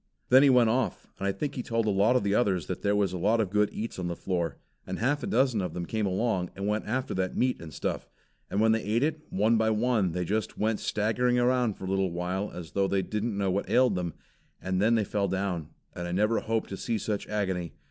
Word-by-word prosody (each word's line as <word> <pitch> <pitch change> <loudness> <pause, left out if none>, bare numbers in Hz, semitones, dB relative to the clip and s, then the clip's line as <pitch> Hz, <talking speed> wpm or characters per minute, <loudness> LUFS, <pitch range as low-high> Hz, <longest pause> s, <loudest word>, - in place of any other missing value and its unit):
Then 130 +2 +8
he 140 - +6
went 125 -3 +5
off, 120 -5 -1
and 100 - -1
I - - +2
think 145 +8 -3
he 125 - -3
told 115 -2 -1
a 105 - +2
lot 100 +5 +3
of 125 - +2
the 100 0 +1
others 100 -7 +2
that 90 - -5
there 100 0 +2
was 100 -3 +1
a 90 - -3
lot 110 +6 +2
of 100 -4 0
good 105 0 +3
eats 110 -2 -5
on 90 - -2
the 85 - -3
floor, 85 -2 -2 0.3
and - - -3
half 145 +5 +1
a - - -3
dozen 125 -3 +2
of 90 - -4
them 85 -1 -3
came 110 +2 -1
along, 95 -2 0
and 100 +1 -3
went 105 +1 -1
after 130 +4 -1
that 95 -1 -2
meat 125 -6 +1
and 80 -2 -8
stuff. - - -3 0.4
And 100 - -1
when 110 +1 +4
they 110 0 +2
ate 110 +5 0
it, 155 0 0
one 110 +4 +2
by 110 0 +2
one 110 -5 +1
they 90 0 -1
just 110 +5 -2
went 110 0 0
staggering 120 +4 +1
around 125 -3 +2
for - - -8
a - - -4
little 95 +1 -1
as 85 -3 -8
though 100 -1 +1
they 95 0 +1
didn't 105 +2 -2
know 100 -2 +1
what 100 +2 -2
ailed 130 -1 +4
them, 90 -3 -3 0.4
and 95 +1 -1
then 115 +3 +4
they 110 - +2
fell 100 0 -1
down, 95 -5 -2 0.3
and 85 0 -5
I - - -4
never 105 +5 +2
hope 115 0 -1
to 95 - -5
see 115 +2 -1
such 105 0 -3
agony. 95 -5 -2
105 Hz, 260 wpm, -28 LUFS, 95-115 Hz, 0.4 s, Then